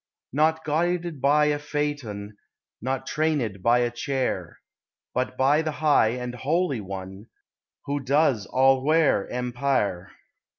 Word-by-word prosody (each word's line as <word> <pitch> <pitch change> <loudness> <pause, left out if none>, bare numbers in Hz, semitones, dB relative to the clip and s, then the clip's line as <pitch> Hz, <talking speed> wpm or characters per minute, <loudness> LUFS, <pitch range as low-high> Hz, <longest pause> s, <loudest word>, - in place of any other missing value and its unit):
Not 160 +2 +2
guided 170 0 -1
by 145 +2 +4
a 150 0 +1
Phaeton, 145 -9 -4 0.5
Not 130 +2 -2
trained 155 +1 0
in 100 -4 -6
a 120 0 +3
chair, 130 +2 -3 0.6
But 130 0 -2
by 140 +4 +3
the 155 -1 -3
high 150 -6 +3
and 125 0 -5
holy 140 +1 0
One, 95 +2 -8 0.6
Who 145 +1 -1
does 135 - +1
all 130 0 +3
where 155 -8 +2
empire. 125 -7 -1
135 Hz, 125 wpm, -25 LUFS, 120-150 Hz, 0.6 s, by